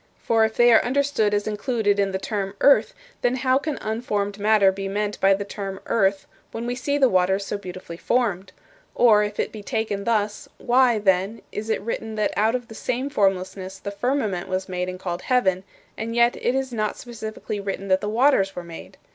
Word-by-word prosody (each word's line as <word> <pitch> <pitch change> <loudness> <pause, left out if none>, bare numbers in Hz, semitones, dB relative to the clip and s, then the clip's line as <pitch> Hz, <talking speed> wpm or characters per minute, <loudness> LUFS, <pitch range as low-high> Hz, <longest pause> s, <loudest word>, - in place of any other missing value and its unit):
For 225 -1 +2
if 220 0 0
they 240 0 +6
are 225 - +6
understood 265 -4 +1
as 205 0 0
included 215 -1 0
in 200 -1 +1
the 190 - -1
term 195 0 -4
'earth,' 280 - +4 0.3
then 245 +1 +1
how 260 +1 +2
can 300 0 -3
unformed 210 -2 -2
matter 205 -2 +4
be 195 +1 -5
meant 205 +1 -2
by 195 0 +5
the 200 +1 -5
term 195 -1 -6
'earth' 195 -3 +1 0.3
when 230 +1 -5
we 245 - -1
see 285 +3 -1
the 270 -2 +5
waters 190 -1 +2
so 205 - -3
beautifully 185 -3 -8
formed? 200 -5 0 0.4
Or, 220 -3 +5
if 210 0 -5
it - - -1
be 215 - -8
taken 210 -3 -2
thus, 210 -2 -1
why, 245 -1 +3
then, 195 +2 +1
is 215 +1 -5
it 220 - 0
written 220 0 -4
that 215 -1 0
out 220 +3 +2
of 245 -2 -4
the - - -11
same 255 +5 -3
formlessness 190 -3 -1
the 200 +1 -6
firmament 205 -4 -1
was 185 0 -2
made 180 -1 -3
and 185 0 -7
called 175 -1 -4
heaven, 190 -8 +1 0.3
and 230 +1 -4
yet 235 0 +4
is 265 0 -1
it - - -4
not 215 -1 -1
specifically 220 -3 -6
written 195 0 -4
that 190 0 +3
the 210 - -2
waters 220 -4 +3
were 180 - -5
made? 170 -1 -11
210 Hz, 205 wpm, -23 LUFS, 195-235 Hz, 0.4 s, they